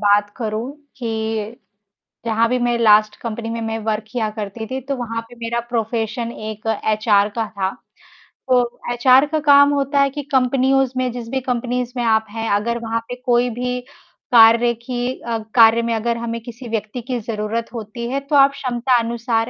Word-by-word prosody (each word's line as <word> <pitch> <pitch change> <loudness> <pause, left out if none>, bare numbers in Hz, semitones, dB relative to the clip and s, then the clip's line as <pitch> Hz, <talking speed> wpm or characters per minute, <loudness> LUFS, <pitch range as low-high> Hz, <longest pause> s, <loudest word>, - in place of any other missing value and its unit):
बात 205 0 +3
करूँ 225 +1 -3 0.3
कि, 220 -2 -3 0.7
जहाँ 230 0 +2
भी 250 +2 +1
मैं 240 0 +1
लास्ट 215 -2 +4
कंपनी 230 0 -4
में 230 0 -3
मैं 225 0 -3
वर्क 220 0 -1
किया 235 -3 -1
करती 215 +1 -6
थी, 260 0 -3
तो 275 +2 -4
वहाँ 230 -2 -3
पे 240 - -13
मेरा 235 +1 -1
प्रोफ़ेशन 230 0 -2
एक 215 0 -8 0.3
एचआर 210 -1 +3
का 225 - 0
था। 190 -1 0 0.8
तो 245 -1 +2
एचआर 255 +3 +5
का 315 - +1
काम 285 -1 +6
होता 280 0 +1
है 275 - +3
कि 290 +2 -5
कंपनीयोज़ 265 0 +2
में, 255 -1 0
जिस 235 -1 -7
भी 265 +1 -1
कंपनीज़ 250 0 -2
में 240 - 0
आप 220 -1 +2
हैं, 225 +1 -4
अगर 220 +4 0
वहाँ 230 0 -1
पे 245 - -4
कोई 245 0 +3
भी 250 +2 -3 0.5
कार्य 235 +1 +6
की 245 +2 -3
अ, 230 -1 0 0.2
कार्य 230 -1 +7
में 230 0 -1
अगर 235 +1 -1
हमें 230 0 -4
किसी 240 +2 -10
व्यक्ति 220 +2 -3
की 250 +1 -3
ज़रूरत 220 +1 -3
होती 230 +1 -6
है, 270 +2 -1
तो 280 +2 -3
आप 275 0 +7
क्षमता 255 -2 0
अनुसार 230 0 -1
235 Hz, 185 wpm, -20 LUFS, 225-250 Hz, 0.8 s, कार्य